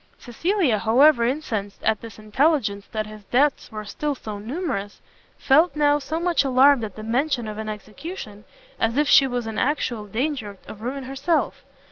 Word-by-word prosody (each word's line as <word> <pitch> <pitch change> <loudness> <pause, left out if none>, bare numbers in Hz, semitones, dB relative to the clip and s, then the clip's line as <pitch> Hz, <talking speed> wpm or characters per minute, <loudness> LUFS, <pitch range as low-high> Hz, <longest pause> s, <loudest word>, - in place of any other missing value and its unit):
Cecilia, 295 - 0
however 235 +3 +5
incensed 230 -7 -3
at 220 -1 +1
this 225 -2 -10
intelligence 215 -2 0
that 215 -1 -2
his 215 -1 -11
debts 275 +4 +1
were 215 -1 -6
still 295 +7 -3
so 215 -5 -7
numerous, 220 - -4 0.4
felt 310 +6 +3
now 295 -1 +3
so 305 +3 -3
much 345 -2 +2
alarmed 270 -1 +5
at 210 -3 -6
the 215 - -8
mention 245 +1 0
of 215 0 -6
an 220 0 -4
execution, 215 - -8 0.4
as 230 +3 0
if 295 0 +3
she 275 -1 +6
was 245 -2 -3
in 220 -1 -4
actual 245 -6 -1
danger 225 -2 -3
of 215 - -10
ruin 265 +4 -4
herself. 275 +6 -1
245 Hz, 170 wpm, -23 LUFS, 215-290 Hz, 0.4 s, she